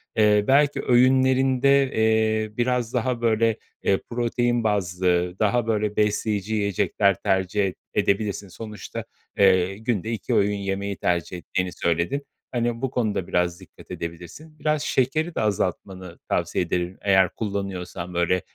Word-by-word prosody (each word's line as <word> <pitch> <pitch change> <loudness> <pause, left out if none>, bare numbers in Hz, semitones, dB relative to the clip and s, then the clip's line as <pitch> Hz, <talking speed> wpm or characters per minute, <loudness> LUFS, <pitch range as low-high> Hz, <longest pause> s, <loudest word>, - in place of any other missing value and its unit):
eee, 105 -1 +4
belki 145 +2 +3
öğünlerinde, 130 +2 +4
eee, 110 -1 +1
biraz 125 -1 0
daha, 125 -1 -1
böyle, 115 -1 +2 0.3
eee, 95 - +2
protein 120 0 0
bazlı, 90 -3 0
daha, 115 +2 +1
böyle, 105 -2 0
besleyici 105 0 0
yiyecekler 100 -1 +1
tercih 95 +2 +1
ed 95 - -4 0.2
edebilirsin. 100 0 0
Sonuçta, 105 +2 -7 0.3
eee, 95 -1 +4
günde 110 -1 -2
2 110 -4 -3
öğün 105 +1 +2
yemeği 100 0 -3
tercih 90 0 -1
ettiğini 90 +1 -3
söyledin. 85 - 0 0.3
Hani, 120 -1 -1
bu 135 - 0
konuda 105 -8 -1
biraz 90 0 0
dikkat 95 - -16
edebilirsin. 90 - -8
Biraz 155 -1 0
şekeri 155 +6 0
de - - 0
azaltmanı 95 -3 -3
tavsiye - - 0
ederim 90 +1 -2
eğer 95 -2 +4
kullanıyorsan, 95 -4 -4
böyle, 85 +1 +1
105 Hz, 135 wpm, -24 LUFS, 95-120 Hz, 0.3 s, eee